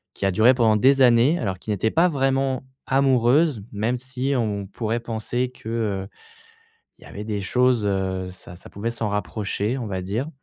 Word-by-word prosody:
qui - - -3
a 95 - +2
duré 115 +7 +5
pendant 110 -3 +3
des 135 +5 +4
années, 125 +7 +5
alors 95 - -3
qui - - -11
n'était 105 +2 0
pas 170 +2 +4
vraiment 135 -3 0 0.2
amoureuse, 135 0 +3
même 110 +4 -1
si 130 +2 -3
on 105 -5 -1
pourrait 110 +4 -3
penser 120 +2 -3
que, 120 -3 -10
heu, 105 -4 -2 0.9
il - - -27
y - - -14
avait 105 - -8
des 105 -2 -3
choses, 125 +3 +2
heu, 95 -2 -1
ça 90 -1 -12
ça 90 - -13
pouvait 110 +4 -3
s'en 115 -2 -3
rapprocher, 105 +3 -2
on 120 - -4
va 95 -3 -4
dire. 110 +10 -3
115 Hz, 190 wpm, -23 LUFS, 100-130 Hz, 0.9 s, duré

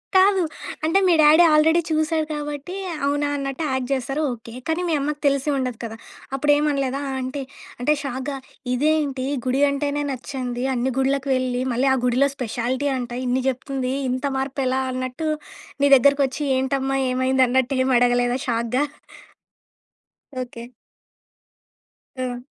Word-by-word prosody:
కాదు. 380 0 +5 0.4
అంటే 335 +5 +3
మీ 350 - +5
daddy 305 +3 +7
already 320 +3 +5
చూసాడు 315 0 +1
కాబట్టి 295 +3 -5 0.3
అవునా! 290 +1 +1
అన్నట్టు 275 +3 -3
యాక్ట్ 260 0 -2
జేస్తరు 270 +3 -1
ఓకే. 230 0 -11
కానీ 320 +2 0
మీ - - +1
అమ్మకి 295 +1 -2
తెలిసి 280 +1 +1
ఉండదు 255 -3 -2
కదా! 225 -1 -5 0.4
అప్పుడు 290 +2 +2
ఏమననలేదా 280 -2 0 0.2
ఆంటీ? 260 +2 -3 0.4
అంటే 255 +5 +3
షాక్‌గా 270 +1 -4 0.4
ఇదేంటి! 285 -1 +1 0.2
గుడి 255 +2 +1
అంటేనే 285 +1 -1
నచ్చనిది, 250 -1 -4
అన్ని 255 +1 0
గుడలకి 270 +1 +1
వెళ్లి 255 -1 -1
మళ్ళీ 250 +3 +1
ఆ - - +3
గుడిలో 255 +3 +3
స్పెషాలిటీ 250 +3 -2
అంట 245 -1 -5
ఇన్ని 250 +1 0
జెప్తుంది, 260 0 -2 0.2
ఇంత 255 +3 -2
మార్పెలా? 265 -1 -1
అన్నట్టు, 255 +5 -3 0.5
నీ 285 - +5
దగ్గరికొచ్చి 280 +1 +3
ఏంటమ్మా, 270 +1 0
ఏమైందన్నట్టు, 260 0 +2
ఏమి 260 -1 +2
అడగలేదా 245 +1 +2
షాక్‌గా? 235 +3 0 1.6
ఓకే. 240 -1 -8 1.5
హ్మ్. 255 -1 -3
265 Hz, 130 wpm, -22 LUFS, 255-290 Hz, 1.6 s, daddy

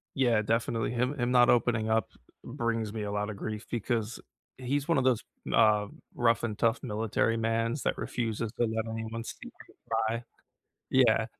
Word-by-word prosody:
Yeah, 120 -5 +3
definitely, 115 +1 0
him 125 +4 -1
him 120 0 +1
not 125 -1 +6
opening 115 -2 +2
up 110 -2 +2 0.4
brings 115 -2 -2
me 110 -2 -4
a 100 0 -3
lotta 105 0 -2
grief 105 +1 -5
because 115 -1 -2 0.4
he's 140 +4 -2
one 165 -5 +3
of 130 - +2
those, 125 -4 +3 0.3
uh, 105 -2 +5 0.3
rough 115 -1 +2
and 110 -3 -3
tough 115 0 +2
military 110 +1 0
mans 115 +3 0
that - - 0
refuses 115 -2 -2
to 120 - +3
let 110 0 -2
anyone 110 +1 -4
see - - -7
him - - -14
cry. 115 +1 0 0.7
Yeah, 115 -4 +4
115 Hz, 170 wpm, -29 LUFS, 110-120 Hz, 0.7 s, not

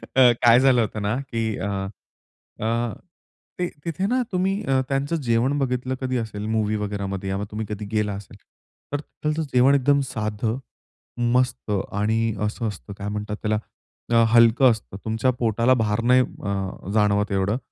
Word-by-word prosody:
अ, 130 -2 +7
काय 120 0 +7
झालं 130 -2 +5
होतं 110 -1 -2
ना, 105 +3 0
की 115 -2 -1
अ, 100 - -3 0.9
अ, 115 +1 -1 0.7
ते 180 - +1 0.2
तिथे 170 +3 -2
ना 255 +3 +2
तुम्ही 190 +2 0
अ, 135 -1 +2
त्यांचं 140 +4 0
जेवण 130 -1 +1
बघितलं 130 -1 -1
कधी 130 -1 -1
असेल 110 -3 -4
मूव्हीवगैरामध्ये 105 -3 -2
या 95 +1 -2
तुम्ही 110 +1 -3
कधी 105 0 -4
गेला 105 -2 0
असेल, 100 0 -9 0.6
तर 145 - 0
त्याचं 155 +1 -3
जेवण 130 +3 +5
एकदम 140 +1 +3
साधं, 110 +1 -2 0.7
मस्त 125 -3 +1 0.2
आणि 110 +2 +1
असं 110 +2 -2
असतं, 100 0 -7
काय 100 +1 -7
म्हणतात 105 0 -3
त्याला, 110 0 +1 0.6
अ, 115 0 +6
हलकं 120 +2 +6
असतं. 110 -3 -5
तुमच्या 115 +3 +1
पोटाला 115 +2 +3
भार 105 +1 0
नाही 130 0 +7
अ, 100 -5 -4
जाणवत 105 -1 +2
एवढं. 100 +3 +1
115 Hz, 155 wpm, -23 LUFS, 105-130 Hz, 0.9 s, अ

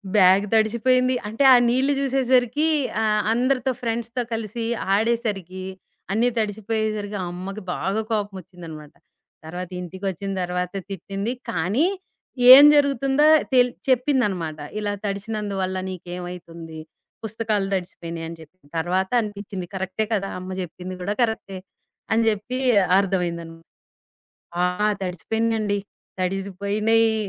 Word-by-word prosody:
Bag 190 0 +6
దడిచిపోయింది. 250 +4 +3
అంటే 225 +6 0
ఆ - - +10
నీళ్ళు 260 +4 +2
జూసేసరికి 260 +1 +2 0.3
ఆహ్, 215 -1 +2
అందరితో 255 +2 +1
ఫ్రెండ్స్‌తో 235 +1 -2
కలిసి 225 +1 -3 0.3
ఆడేసరికి 205 -5 -1 0.5
అన్నీ 225 +4 +2
తడిచిపోయేసరికి 215 -1 -2
అమ్మకి 190 +4 -6
బాగా 200 +3 -1
కోపమొచ్చిందనమాట. 180 -7 -5 0.5
తర్వాత 180 +2 -6
ఇంటికొచ్చిన 190 +2 -5
తర్వాత 180 +1 -2 0.2
తిట్టింది. 195 +4 -4 0.2
కానీ 190 - +1 0.7
ఏం 280 +2 +11
జరుగుతుందో 280 0 +3 0.3
తెల్ 250 -1 +5 0.2
చెప్పిందనమాట. 220 - +1 0.2
ఇలా 205 -1 -2
తడిసినందువల్ల 200 -2 -3
నీకేమైతుంది, 175 -3 -8 0.4
పుస్తకాలు 215 -2 -1
దడిచిపోయినాయి 170 -3 -4
అని 165 - -8
జెప్పిన 160 0 -18
తర్వాత 185 +3 0
అనిపించింది. 200 -3 -6
కరెక్టే 190 +3 -2
కదా! 195 -2 -1
అమ్మ 185 +1 -8
జెప్పింది 180 +1 -7
గూడా 205 +3 -2
కరెక్టే. 220 -4 -3 0.5
అని 225 +1 +3
జెప్పి 220 +5 -3 0.4
అర్థమైంది 180 -4 -1
అనమ 165 0 -11 1.1
ఆ! - - +4 0.4
తడిసిపోయినాయండి. 210 +4 -1 0.4
తడిసిపోయినియి. 200 +4 +1
205 Hz, 105 wpm, -23 LUFS, 185-225 Hz, 1.1 s, ఏం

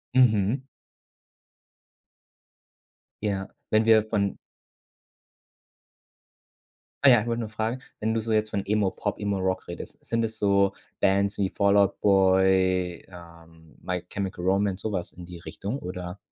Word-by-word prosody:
Mhm. 120 +1 +3 2.6
Ja, 100 -2 -2 0.2
wenn 110 +1 +3
wir 110 -1 +6
von 100 -3 0 2.7
ah 140 - +8
ja, 120 -4 +6
ich 120 - -6
wollte 115 0 -1
nur 110 - -4
fragen, 110 +4 -3 0.2
wenn 110 +1 0
du 115 - 0
so 115 0 -4
jetzt 110 0 +2
von 100 -2 -3
Emo 105 -2 +1
Pop, 105 - -4
Emo 100 -1 -1
Rock 95 0 -1
redest, - - -8
sind 115 0 -1
es 110 -1 -4
so 100 -1 +3 0.3
Bands 100 +1 +2
wie 95 -2 0
Fall 100 0 +3
Out 100 -1 +3
Boy, 95 -2 +3
ähm, 85 -2 -15
My 90 -1 -3
Chemical 95 -3 -4
Romance, 95 0 +1
so 110 - -3
was 90 -3 -3
in 90 0 -10
die 90 -1 -9
Richtung, 105 +8 -5
oder? 90 +1 -6
100 Hz, 145 wpm, -26 LUFS, 95-110 Hz, 2.7 s, ah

